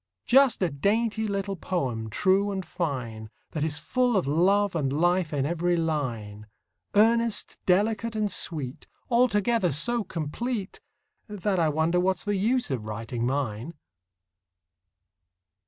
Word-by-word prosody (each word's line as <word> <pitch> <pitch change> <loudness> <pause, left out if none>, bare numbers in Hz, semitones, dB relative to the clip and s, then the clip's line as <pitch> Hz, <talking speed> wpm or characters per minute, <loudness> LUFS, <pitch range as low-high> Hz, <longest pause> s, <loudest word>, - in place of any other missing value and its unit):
Just 265 -5 +4
a 175 - +1
dainty 220 +8 0
little 200 -1 -2
poem, 130 -12 -3
true 190 - +2
and 190 -2 -4
fine, 125 -11 -4 0.2
That 155 - -2
is 155 -2 0
full 245 +8 +1
of 185 - +1
love 185 +7 +2
and 140 -5 0
life 175 +3 +1
in 140 -2 0
every 175 +2 0
line, 115 -10 -3 0.5
Earnest, 230 +1 +2
delicate, 215 +4 +2
and 210 -2 0
sweet, 145 -8 -3 0.2
Altogether 230 -5 +3
so 230 - +1
complete 195 - -4 0.5
That 205 -2 -1
I 160 -2 +3
wonder 160 +4 +1
what's 185 +1 0
the 205 0 0
use 230 - +1
of 120 -5 -3
writing 115 +2 -3
mine. 130 +2 -3
180 Hz, 130 wpm, -26 LUFS, 145-210 Hz, 0.5 s, Just